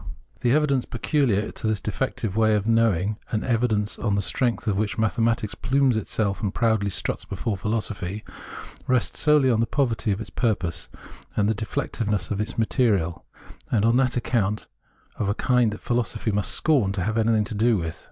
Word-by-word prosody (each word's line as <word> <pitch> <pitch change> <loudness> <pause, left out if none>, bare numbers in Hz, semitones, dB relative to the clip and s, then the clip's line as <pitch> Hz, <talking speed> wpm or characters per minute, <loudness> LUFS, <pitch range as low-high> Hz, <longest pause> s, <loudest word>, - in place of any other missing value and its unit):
The 120 - +1
evidence 140 -4 +2
peculiar 120 -5 0
to - - -4
this 110 -2 0
defective 110 -2 -3
way 110 -1 +4
of 105 -1 0
knowing 110 -3 +2
— - - -30
an 110 - 0
evidence 115 -4 0
on 105 -3 0
the 100 - +1
strength 120 +4 -1
of 100 -2 0
which 105 -1 -1
mathematics 110 +1 +1
plumes 130 0 +2
itself 105 -1 -1
and 100 -4 -1
proudly 110 -3 +1
struts - - -1
before 110 - -3
philosophy 105 -1 -3 0.3
— - - -13
rests 125 -2 +1
solely 150 -4 +4
on 115 - +2
the 115 - +2
poverty 120 -6 0
of 100 - -1
its 110 - -7
purpose 95 -8 -1 0.5
and 100 -1 +2
the 110 - +2
de 110 0 -5
fectiveness 105 -3 -2
of 100 0 0
its 105 - -4
material, 105 -7 +1 0.4
and 110 -2 +2
is - - +5
on 120 - +3
that 130 -1 +2
account 105 -4 0 0.5
of 100 - 0
a 100 - 0
kind 125 -2 +2
that 105 - -7
philosophy 120 -2 -1
must 100 -1 0
scorn 130 -11 +2
to 95 -2 -2
have 110 +3 -1
anything 110 -1 +3
to 115 - -6
do 110 +1 +3
with. 80 -2 -4
110 Hz, 195 wpm, -24 LUFS, 105-120 Hz, 0.5 s, is